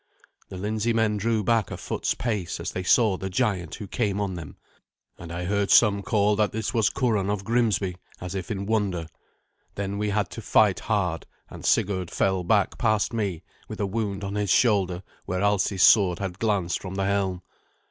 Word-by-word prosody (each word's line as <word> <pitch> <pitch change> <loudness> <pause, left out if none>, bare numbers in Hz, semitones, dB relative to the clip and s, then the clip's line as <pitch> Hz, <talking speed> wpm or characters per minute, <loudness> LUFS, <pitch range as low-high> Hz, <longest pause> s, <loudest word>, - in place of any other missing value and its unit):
The 95 - -7
Lindseymen 110 +2 0
drew 110 0 0
back 115 -2 +1
a - - -5
foot's - - -2
pace 105 -8 -3
as - - -4
they 90 - -3
saw 100 +1 +3
the 95 - -4
giant 95 -6 -1
who 105 - -7
came 100 -2 -1
on 100 -2 -2
them, 85 -4 -8 0.6
and 85 -1 -9
I 85 +1 -4
heard 100 +1 0
some 100 -3 +5
call 105 0 +2
that 105 -1 +2
this 110 +3 -3
was 110 -3 +3
Curan 110 -7 0
of 100 -1 -2
Grimsby, 105 -5 0 0.2
as 90 -1 -6
if 95 -3 -5
in 100 -2 -3
wonder. 100 -6 0 0.7
Then 100 0 -3
we 105 0 0
had 105 0 -1
to 115 - -7
fight 105 -2 +3
hard, 90 -7 -1 0.2
and - - -10
Sigurd 95 -3 +1
fell 95 +1 0
back 100 +2 +1
past 110 -1 +1
me, 100 -7 -2 0.2
with - - -8
a 100 - +1
wound 100 0 -3
on 100 0 -4
his 105 -1 -1
shoulder 95 -5 +2 0.2
where 90 +1 -1
Alsi's 100 -2 +2
sword 95 -5 +6
had 95 -1 -5
glanced 100 -6 0
from 95 0 -6
the 95 0 -1
helm. 95 -2 -1
100 Hz, 190 wpm, -25 LUFS, 95-110 Hz, 0.7 s, sword